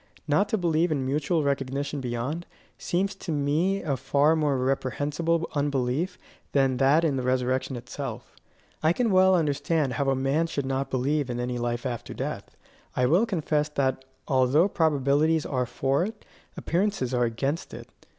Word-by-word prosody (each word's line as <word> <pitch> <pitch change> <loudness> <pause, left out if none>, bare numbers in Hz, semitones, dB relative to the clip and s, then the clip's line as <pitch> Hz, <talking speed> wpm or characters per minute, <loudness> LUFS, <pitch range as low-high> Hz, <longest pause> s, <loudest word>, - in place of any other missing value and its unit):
Not 195 +8 +2
to 220 - +1
believe 170 -2 +1
in 140 -4 0
mutual 150 +4 0
recognition 140 +1 -2
beyond, 125 +7 -3 0.3
seems 195 +3 -1
to 185 - -5
me 155 +7 +1
a 145 -4 0
far 140 +4 +2
more 150 -4 +1
reprehensible 145 +6 0
unbelief 145 +4 -1 0.4
than 135 -2 +3
that 140 +5 +4
in 145 -5 +1
the - - -1
resurrection 130 +1 0
itself. 120 -1 -7 0.5
I 160 +2 +3
can 235 +2 +1
well 190 0 +5
understand 150 -3 0
how 135 +3 0
a 135 - +2
man 135 +5 +1
should 140 -4 -3
not 135 +1 -2
believe 140 +2 0
in 120 0 -3
any 125 0 -2
life 120 +1 -2
after 120 -3 -4
death. - - -5 0.4
I 125 - +2
will 175 - +3
confess 155 -6 0
that 130 -3 -1 0.2
although 135 +6 +4
probabilities 155 -2 +2
are 125 -3 -1
for 135 +8 0
it, 215 0 -8 0.3
appearances 170 -8 -1
are 120 -1 +2
against 135 +8 -2
it. - - -9
140 Hz, 160 wpm, -26 LUFS, 130-160 Hz, 0.5 s, well